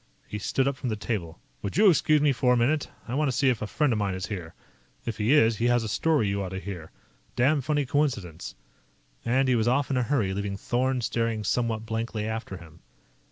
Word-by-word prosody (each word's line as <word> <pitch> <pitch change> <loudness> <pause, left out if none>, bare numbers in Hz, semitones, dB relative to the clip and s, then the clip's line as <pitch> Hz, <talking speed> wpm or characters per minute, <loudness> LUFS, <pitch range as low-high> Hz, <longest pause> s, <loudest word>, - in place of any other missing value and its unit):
He 105 - -5
stood 135 +6 0
up 140 -1 -1
from 125 - -3
the 110 - -1
table. 105 -6 -4 0.2
"Would 100 - -4
you 210 +1 +6
excuse 155 -4 +4
me 145 -1 +4
for 125 0 +2
a - - +3
minute? 140 +5 +1 0.2
I 120 - -4
want 150 +2 +1
to - - +1
see 135 - +4
if 120 -3 0
a 105 - -2
friend 150 +2 +1
of 110 - -1
mine 100 -2 -1
is 95 - -4
here. 90 -6 -6 0.5
If 110 - -4
he 110 +4 +2
is, 115 -7 +5
he 115 - 0
has 120 -1 +3
a - - -3
story 145 +1 +1
you 100 0 -1
ought 95 - -3
to 95 +1 -5
hear. 90 -5 -7 0.5
Damned 135 +2 +2
funny 150 -2 +1
coincidence." 125 - -2 0.7
And 130 +3 +2
he 130 - +3
was 115 -1 +1
off 140 +3 +1
in 130 - +1
a - - +2
hurry, 115 -7 0
leaving 100 0 -3
Thorn 125 +4 0
staring 115 -2 -1
somewhat 115 +1 -1
blankly 110 -1 -3
after 110 -3 -4
him. 85 -1 -14
115 Hz, 235 wpm, -27 LUFS, 100-135 Hz, 0.7 s, you